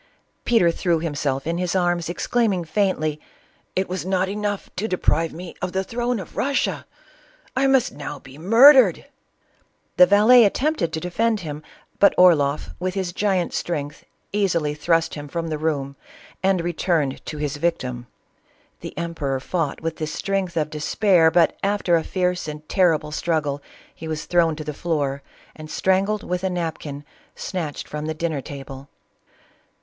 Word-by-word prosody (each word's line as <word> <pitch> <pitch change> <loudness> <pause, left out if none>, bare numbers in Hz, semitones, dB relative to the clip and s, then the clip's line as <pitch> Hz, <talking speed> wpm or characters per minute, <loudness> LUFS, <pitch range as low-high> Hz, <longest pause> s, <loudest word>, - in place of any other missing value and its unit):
Peter 220 -8 +4
threw 170 -1 0
himse49in 150 0 -2
his 180 0 -1
arras, 175 -2 +1
ex 175 - -4
claiming 210 -8 +1
faintly, 155 -4 0 0.3
" - - -38
It 190 +1 0
was 185 -3 -4
not 190 +1 0
enough 205 0 -3
to 210 +4 -1
deprive 165 -4 +1
me 175 +1 -8
of 180 - -3
the 190 0 0
throne 240 +2 -2
of 190 - -10
Russia! 275 +1 -1 0.3
— - - -31
I 270 +1 +3
must 265 -2 +3
now 145 0 -7
be 135 +2 -14
murdered 230 - +6 0.5
!'* - - -42
The 180 0 +8
valet 215 +5 +7
attempted 250 - +1
to 160 - -1
defend 215 +5 0
him, 150 -3 -6 0.4
but 200 - +5
Orloff 150 -5 +4
with 185 +1 -2
his 185 -3 -2
giant 190 -2 0
strength 150 -2 -3 0.3
easily 170 -7 +1
thrust 165 +2 +1
him 145 -1 -7
from 165 +2 -4
the 155 -1 -3
room, 140 -3 -2 0.5
and 190 -1 +2
re 175 +1 -2
turned 155 -6 0
to 155 - -5
his 145 -1 -3
victim. 130 -7 -2 0.7
The - - -9
emperor 160 -6 -2
fought 155 +1 -2
with 165 0 -3
the 155 - -3
strength 190 +1 -2
of 155 -1 0
despair, 165 +2 +3
but 165 0 +3
after 200 -3 +1
a 165 - +1
fierce 180 -2 -1
and 150 0 -7
terrible 165 -5 +2
strug 160 0 0
gle 145 -1 -3 0.3
he 160 - -9
was 155 -1 -4
thrown 170 -3 +2
to 155 - -6
the 150 0 -5
floor 145 -4 -2 0.3
and 155 0 -10
strangled 195 +5 +1
with 180 +1 -3
a 190 - +1
napkin, 160 -5 -4 0.3
snatched 165 -6 -5
from 150 +1 -5
the 160 - -3
dinner 160 -3 -2
table. 135 0 -9
170 Hz, 170 wpm, -22 LUFS, 150-190 Hz, 0.7 s, The